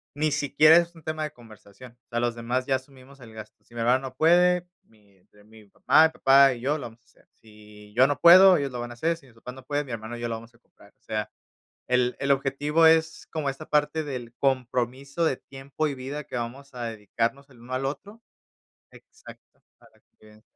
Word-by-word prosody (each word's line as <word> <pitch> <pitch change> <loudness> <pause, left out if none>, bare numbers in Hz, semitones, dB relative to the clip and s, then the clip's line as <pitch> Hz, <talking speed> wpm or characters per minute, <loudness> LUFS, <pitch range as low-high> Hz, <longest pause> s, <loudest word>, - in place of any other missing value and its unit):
ni 155 +1 0
siquiera 150 +2 +5
es 170 0 0
un 165 - -16
tema 155 0 -4
de 150 - -4
conversación. 115 -1 -16
O - - -70
sea, 120 - -2
los 120 -1 0
demás 120 +2 -2
ya 135 - +1
asumimos 130 +1 -11
el 115 -3 -14
gasto. 110 -1 -12
Si 120 - -24
mi 115 - -4
hermano 125 +3 +3
no 130 - -24
puede, 175 +4 +3 0.2
mi 105 -3 -28
entre 105 +3 -25
mi 110 0 -18
papá 160 +10 +3
papá 135 -1 +5
y 120 - -10
yo 145 +4 0
lo 145 - -8
vamos 115 +1 -17
a - - -40
hacer. 110 - -28
Si 105 -1 -17
yo 130 +2 +5
no 145 - -2
puedo, 185 +1 +8
ellos 140 -2 -3
lo 125 - -6
van 120 0 -6
a - - -7
hacer. 165 +7 -1
Si 145 -5 -20
mis 115 - -22
papás 125 +2 -10
no 130 0 -13
puede, 145 +1 -2
mi 130 - -11
hermano, 115 +1 -6
y 120 - -10
yo 120 - -2
lo 115 - -3
vamos 115 +1 -12
a - - -22
comprar. 100 -4 -23
O - - -49
sea, 110 -1 -4 0.6
el 125 0 +1
el 140 - 0
objetivo 145 +4 +1
es 160 0 +2
como 150 -3 -2
esta 135 +3 -7
parte 150 +1 0
del 125 -5 -7
compromiso 130 +3 -1
de 135 -5 0
tiempo, 140 +3 -5
y 140 - -4
vida 140 +3 -6
que 135 - -9
vamos 135 +4 -7
a 120 -1 -6
dedicarnos 115 +5 -4
el 125 -3 -19
uno 125 +2 -9
al 130 +1 -2
otro. 205 +11 -7 0.7
Exacto. - - -17 0.2
Para - - -24 0.2
qué 110 0 -19
130 Hz, 230 wpm, -25 LUFS, 115-150 Hz, 0.7 s, puedo